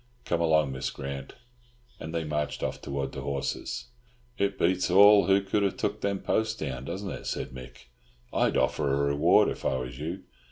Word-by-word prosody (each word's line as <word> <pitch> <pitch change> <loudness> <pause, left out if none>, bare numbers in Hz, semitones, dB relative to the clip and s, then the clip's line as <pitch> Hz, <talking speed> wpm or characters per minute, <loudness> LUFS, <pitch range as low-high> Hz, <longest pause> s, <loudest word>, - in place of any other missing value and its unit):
"Come 85 -1 0
along, 80 -4 +3
Miss 65 0 -3
Grant." 70 -1 -6 0.7
And 80 - -6
they 85 0 -2
marched 75 -1 -2
off - - -3
towards 70 -1 -3
the 65 - -5
horses. 70 - -3 0.5
"It 100 -3 0
beats 90 +2 +1
all 100 +3 +7
who 100 0 +4
could 100 +1 0
have 100 -2 0
took - - -2
them 100 -1 -1
posts 110 0 0
down, 65 - -5
doesn't 95 +6 -4
it?" - - -7
said - - -3
Mick. 65 -1 -12 0.4
"I'd - - +2
offer 70 - +1
a 70 - +2
reward, 70 +5 +4
if - - -4
I - - +1
was 65 0 -5
you. 85 +5 -5
80 Hz, 190 wpm, -28 LUFS, 70-95 Hz, 0.7 s, all